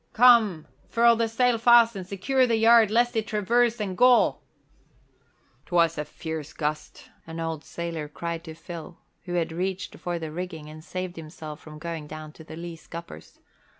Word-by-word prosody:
Come, 220 -9 +5 0.2
furl 235 0 +5
the 230 0 +1
sail 235 +1 +2
fast 235 -1 +6
and 185 -2 -6
secure 255 +7 +1
the 230 - +2
yard 225 -1 +6
lest 240 +2 +2
it 220 -1 0
traverse 230 +3 +2
and 195 -3 -3
gall!" 250 +3 +4 1.3
"'Twas 170 -2 +3
a 150 - -3
fierce 160 0 -6
gust," 150 0 -4 0.2
an 165 0 -7
old 160 -2 -3
sailor 165 -3 -5
cried 165 +2 -5
to 160 -1 -8
Phil, 165 0 -9 0.3
who 175 -1 -4
had 165 -2 0
reached 185 +3 -4
for 175 -1 -3
the 160 -2 -5
rigging 165 -2 -6
and 155 0 -11
saved 185 0 -5
himself 155 -1 -8
from 155 -1 -12
going 160 -1 -6
down 155 0 -8
to 160 - -14
the 155 - -10
lee 170 0 -7
scuppers. 165 - -10
175 Hz, 175 wpm, -26 LUFS, 160-225 Hz, 1.3 s, fast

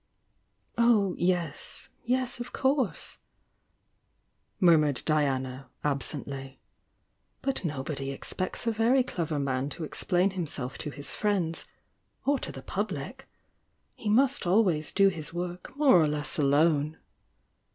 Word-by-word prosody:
"Oh, 215 -5 +4
yes! 175 -4 -2
— - - -38
yes, 255 0 0
of 240 - -6
course!" 265 -4 0 1.4
murmured 155 -7 +4
Diana, 135 -4 0
ab 140 -2 +1
sently. 135 -2 -5 0.9
"But 270 -5 -1
nobody 140 -3 -3
expects 185 - -4
a 230 - +2
very 235 +4 +3
clever 165 -10 -3
man 135 -1 -1
to 160 - -6
explain 180 +4 +1
himself 145 -8 -4
to - - -4
his 145 0 -1
friends 185 -6 -1 0.3
— - - -44
or 280 -1 +2
to - - -2
the - - -9
public. - - -4 0.7
He 215 - -4
must 255 -1 +3
always 180 -6 +2
do 195 0 +5
his 165 -2 -7
work 180 +8 -5
more 275 - +6
or 155 - +3
less 150 0 -1
alone." 150 +2 +3
170 Hz, 130 wpm, -28 LUFS, 145-210 Hz, 1.4 s, more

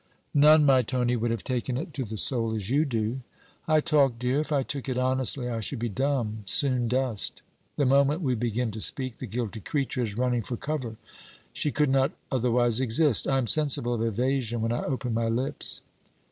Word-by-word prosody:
'None, 150 +1 +6
my 135 -2 +5
Tony, 125 0 0
would 120 0 -1
have 115 0 -2
taken 125 -1 -2
it 160 +3 -6
to 135 - -3
the 110 -1 -6
soul 115 -1 +1
as 105 +1 -4
you 145 +3 +3
do.' 115 -1 -2 0.5
'I 155 -1 +4
talk, 145 -7 +2
dear. 125 +4 0
If 155 - -3
I 140 -2 +2
took 140 0 -4
it 125 - -2
honestly, 130 0 +1
I 115 -2 -3
should 120 +5 -3
be 120 +1 -2
dumb, 120 -2 -1
soon 125 0 +1
dust. 125 -3 -1 0.3
The 145 - +1
moment 140 +5 +3
we 130 -3 +1
begin 120 0 -1
to 110 +1 -6
speak, 130 0 +1
the 130 - -6
guilty 115 -1 -4
creature 135 +1 -2
is 110 -3 -3
running 125 -1 +1
for 120 +2 -5
cover. 130 -6 -4 0.6
She 150 - -1
could 150 -1 +1
not 135 0 +2 0.2
otherwise 120 -2 +1
exist. 130 0 +3
I 135 - +2
am 130 - 0
sensible 120 0 +2
of 115 - -2
evasion 120 +1 -1
when 115 +1 0
I 120 - -2
open 130 -3 -2
my 115 0 0
lips.' 130 +6 -1
125 Hz, 200 wpm, -27 LUFS, 115-135 Hz, 0.6 s, None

